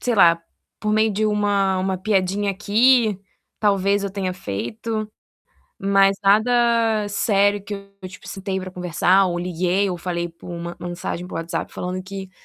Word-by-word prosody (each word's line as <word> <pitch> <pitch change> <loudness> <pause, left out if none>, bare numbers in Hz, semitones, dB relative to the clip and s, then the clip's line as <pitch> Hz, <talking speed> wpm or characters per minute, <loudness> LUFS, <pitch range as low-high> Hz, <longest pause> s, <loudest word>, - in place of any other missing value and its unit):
sei 245 - 0
lá, 170 -5 +5 0.4
por 215 0 -1
meio 215 0 +3
de 215 +2 0
uma-uma 195 -3 +1
piadinha 200 0 0
aqui, 215 +2 +3 0.4
talvez 200 -1 +2
eu 200 - -2
tenha 190 -1 -2
feito, 215 - -4 0.7
mas 195 0 +3
nada 225 +1 +3
sério 205 -1 +2
que 205 +1 -6 0.3
eu 185 - -7
tipo, 185 - -13
citei 195 0 -4
para 185 0 -6
conversar 180 +2 +2
ou 175 -1 -2
liguei 180 +3 0
ou 175 - -4
falei 175 0 -3
por 165 - -14
uma 170 0 -5
mensagem 175 0 -5
para - - -9
o - - -3
WhatsApp 165 0 -4
falando 185 +1 -4
que 190 0 -8
195 Hz, 160 wpm, -22 LUFS, 180-210 Hz, 0.7 s, lá